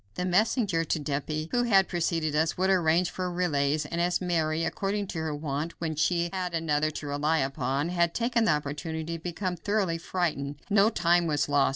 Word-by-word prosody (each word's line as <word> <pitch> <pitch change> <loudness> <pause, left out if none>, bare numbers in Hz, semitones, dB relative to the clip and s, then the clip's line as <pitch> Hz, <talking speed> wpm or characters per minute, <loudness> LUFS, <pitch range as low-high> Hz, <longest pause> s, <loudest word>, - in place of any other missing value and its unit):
The 180 - -2
messenger 190 -2 +2
to 165 - -1
Dieppe 155 +2 -3
who 245 - +2
had 195 -6 +4
preceded 165 -3 -1
us 160 +1 +1
would 190 +1 +2
arrange 175 -1 +2
for 185 -1 -3
relays, 150 -4 0
and 170 +3 -2
as 175 +1 +1
Mary, 165 -3 0
according 200 +3 -2
to 165 - -4
her 160 -2 -2
wont 150 +2 -4
when 160 -2 -2
she 170 +2 +1
had 180 -2 -2
another 155 -2 +1
to 150 - -7
rely 145 +3 0
upon, 135 +2 -1
had 170 -1 +1
taken 235 -1 +1
the - - +4
opportunity 160 +3 -3
to - - -25
become 180 +1 -3
thoroughly 190 -2 -1
frightened, 160 -5 -2 0.2
no 205 +1 +5
time 175 -4 +2
was 145 -2 +1
lost. 145 -1 +3
165 Hz, 195 wpm, -28 LUFS, 150-180 Hz, 0.2 s, no